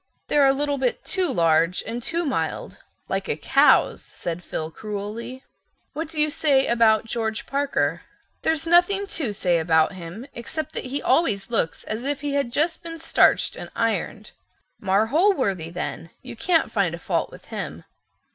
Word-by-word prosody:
"They're 285 -2 +5
a - - +6
little 285 0 -1
bit 255 -2 -1
too 365 -2 +1
large 165 +1 +2
and 230 +2 -4
too 335 +7 -2
mild—like 270 -3 -4
a - - -1
cow's," - - +4
said 175 +1 -5
Phil 160 -1 -4
cruelly. 215 +7 -6 0.5
"What 320 +3 -3
do 315 0 -6
you 300 0 +2
say 275 -3 +3
about 225 -2 +3
George 225 -1 -2
Parker?" 280 0 0 0.4
"There's 320 0 0
nothing 355 +4 +4
to 320 - -2
say 180 -4 +1
about 160 -1 +3
him 185 +5 -8
except 305 +7 -4
that - - -4
he 275 +3 -3
always 205 -11 +1
looks 185 -8 0
as 220 +3 -4
if 285 +1 -2
he 290 -1 -2
had 280 -4 0
just 320 +5 0
been 330 -1 -6
starched 325 - +3
and - - -8
ironed." - - -2 0.5
"Marr 195 +2 +2
Holworthy 260 - +1
then. 165 -1 -5
You - - -8
can't 330 +6 +1
find - - +1
a - - -9
fault - - -1
with - - -14
him." - - -5
250 Hz, 165 wpm, -24 LUFS, 200-305 Hz, 0.5 s, a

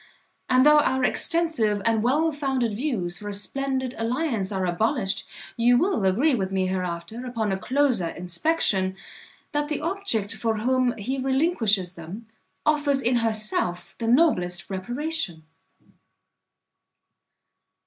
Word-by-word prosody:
And 255 +1 +5
though 300 0 +7
our 265 -3 +1
extensive 250 -8 +1
and 225 -1 +2
well 295 +8 +2
founded 270 -5 -1
views 205 - -2
for 205 - -6
a - - -4
splendid 260 +4 -1
alliance 230 -4 -1
are 190 -2 -1
abolished, 195 +3 -1 0.3
you 240 +1 +4
will 360 - +1
agree 245 +11 +3
with 190 -5 -1
me 190 -1 0
hereafter, 185 +5 -4
upon 230 -5 -2
a 190 - 0
closer 255 -7 +1
inspection, 185 - 0 0.6
that 295 0 -1
the 300 -1 -2
object 320 - 0
for 225 -1 -1
whom 250 +2 +1
he 255 +6 -3
relinquishes 255 - +1
them, 180 +7 -9 0.4
offers 290 -3 +2
in 245 +1 +3
herself 215 -6 -1
the 230 - -2
noblest 215 - +2
reparation." 240 - -3
235 Hz, 130 wpm, -25 LUFS, 195-275 Hz, 0.6 s, though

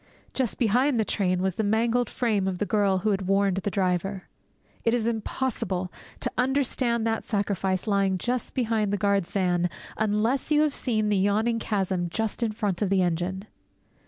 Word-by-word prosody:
Just 260 -5 -1
behind 250 +3 +2
the 220 - +2
train 185 -3 0
was 190 -1 +1
the 220 - -2
mangled 230 +3 +1
frame 215 -6 0
of 185 -1 -1
the 210 - -1
girl 205 -3 +2
who 210 +3 0
had 195 -2 -1
warned 195 -1 +2
the 195 +1 -1
driver. 190 0 -1 0.6
_It 230 - +2
is 240 -2 +1
impossible 220 -5 -2 0.3
to - - -2
understand 250 -3 +1
that 225 -1 0
sacrifice 195 -3 -1
lying 195 -3 +2
just 245 +6 -3
behind 225 -4 +1
the 205 - +1
guard's 200 -2 +1
van 180 -2 +1 0.3
unless 220 +6 0
you 300 -1 +4
have 300 -2 +1
seen 215 -6 0
the 205 - +2
yawning 215 +4 +2
chasm 190 -5 -1
just 220 +5 -2
in 230 -2 +1
front 205 -4 -2
of 205 - +1
the 190 -1 +3
engine! 180 +3 -2
205 Hz, 180 wpm, -26 LUFS, 190-230 Hz, 0.6 s, you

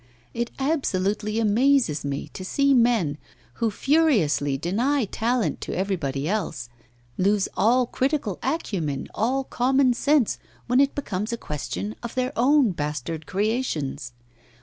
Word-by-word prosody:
It 235 0 -2
absolutely 215 - 0
amazes 230 - +2
me 140 -1 -4
to 185 - -8
see 280 +8 +2
men, 230 - +2 0.4
who 230 - +3
furiously 210 - +2
deny 235 - 0
talent 230 +3 -1
to - - -4
everybody 155 -8 -2
else, 170 - -2 0.5
lose 200 +1 +2
all 245 +3 +3
critical 260 - -1
acumen, 185 - -2
all 260 +5 0
common 260 0 +2
sense, 280 -1 +2 0.3
when 250 +2 +2
it 280 0 +3
becomes 215 -5 -3
a 235 - -2
question 120 - -5
of 235 - -7
their 255 +1 -1
own 260 -1 +4
bastard 150 0 -4
creations. 185 - -2
215 Hz, 125 wpm, -24 LUFS, 160-260 Hz, 0.5 s, own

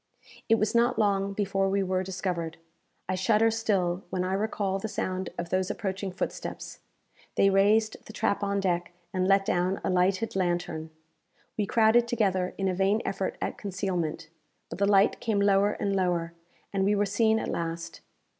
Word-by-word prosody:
It 225 - +6
was 215 -1 0
not 235 +1 +3
long 200 -2 +1
before 195 -1 0
we 195 0 +1
were 185 0 0
discovered. 180 -3 -3 0.5
I 185 - -1
shudder 215 +4 +3
still 195 -5 0
when 185 -1 -1
I 185 +1 -1
recall 195 -1 -1
the 220 - -3
sound 185 -3 -3
of 170 0 -4
those 185 +1 0
approaching 195 -2 -3
footsteps. 180 - -5 0.6
They 195 - +4
raised 210 +3 +3
the - - -8
trap 200 - 0
on 200 0 0
deck, 175 -2 -1 0.2
and 185 0 +1
let 195 0 +4
down 180 +2 0
a - - 0
lighted 185 +4 +1
lantern. 175 -3 -1 0.7
We 210 -2 -1
crowded 230 +1 +4
together 190 -6 0
in 195 - 0
a 185 - +1
vain 195 +4 +1
effort 195 0 -2
at - - -3
concealment; 180 -5 -3 0.4
but - - -6
the 200 - +3
light 200 0 +4
came 220 -3 0
lower 200 0 +3
and 200 -1 -1
lower, 175 -3 0 0.4
and 195 -1 +1
we 205 +2 +3
were 205 0 +2
seen 220 +2 +2
at - - -2
last. 165 0 -4
195 Hz, 175 wpm, -28 LUFS, 185-205 Hz, 0.7 s, It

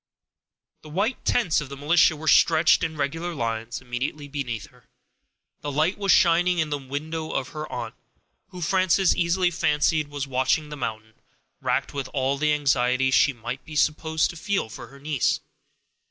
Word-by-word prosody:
The 155 - -13
white 200 - -1
tents 185 -12 +2
of 145 - -7
the 140 - -8
militia 155 +3 +4
were 155 +1 -8
stretched 160 +1 +5
in 160 -1 -2
regular 165 +5 -2
lines 115 -1 -3
immediately 130 +4 -4
beneath 135 -6 -4
her. - - -24 0.7
The 145 - -4
light 155 +7 +1
was 200 -2 +2
shining 175 +1 +4
in 155 -3 0
the 145 - -1
window 155 +4 -5
of 130 - -2
her 155 0 -7
aunt, - - -5 0.5
who, 180 -2 -10
Frances 185 +1 +3
easily 175 +1 +1
fancied, 150 -1 +1
was 145 -1 -4
watching 135 +3 0
the 150 - -6
mountain, 110 -5 -5 0.5
racked - - -1
with 140 -3 -3
all 135 +1 0
the 150 0 +2
anxiety 130 -3 +2
she 140 - +4
might 120 +1 -6
be 155 - -10
supposed 160 +1 +1
to - - -13
feel 180 - -2
for 120 +1 -9
her 140 +4 -15
niece. 145 -2 0
150 Hz, 170 wpm, -25 LUFS, 135-165 Hz, 0.7 s, stretched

